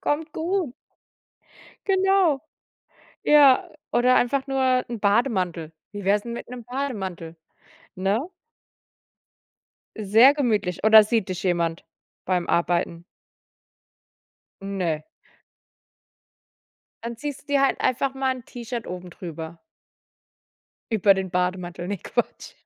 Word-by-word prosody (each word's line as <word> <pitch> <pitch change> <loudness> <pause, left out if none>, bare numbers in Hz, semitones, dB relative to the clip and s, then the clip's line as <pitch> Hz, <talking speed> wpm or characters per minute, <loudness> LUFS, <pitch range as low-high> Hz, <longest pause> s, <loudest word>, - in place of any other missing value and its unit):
Kommt 310 +1 -2
gut. 340 -4 -2 1.1
Genau. 385 -6 +3 0.8
Ja, 285 -3 +5 0.2
oder 250 +1 +4
einfach 265 +3 +1
nur 260 -2 +1
'n 235 -2 -5
Bademantel. 190 - 0 0.2
Wie 205 -1 -7
wär's 200 +1 +2
'n 235 - -5
mit 235 - -7
'nem 245 -1 -8
Bademantel? 195 -11 -5 0.6
Ne? 195 +4 +1 1.8
Sehr 220 +5 +6
gemütlich. 215 - -1
Oder 220 0 +9
sieht 215 -2 0
dich 185 -2 -4
jemand 170 -3 -1 0.4
beim 180 -2 0
Arbeiten? 170 0 0 1.6
Ne. 180 -6 -2 2.0
Dann 235 0 -5
ziehst 290 +2 -6
du - - -37
dir 285 -1 +2
halt 275 - +1
einfach 265 +2 0
mal 265 -1 0
'n 250 - -11
T-Shirt 240 -1 -6
oben 180 0 -7
drüber 165 -1 -8 1.3
über 205 -2 +5
den 190 -1 -3
Bademantel, 180 -1 -2
ne 200 -1 -3
Quatsch. - - -3
220 Hz, 110 wpm, -24 LUFS, 180-265 Hz, 2.0 s, Oder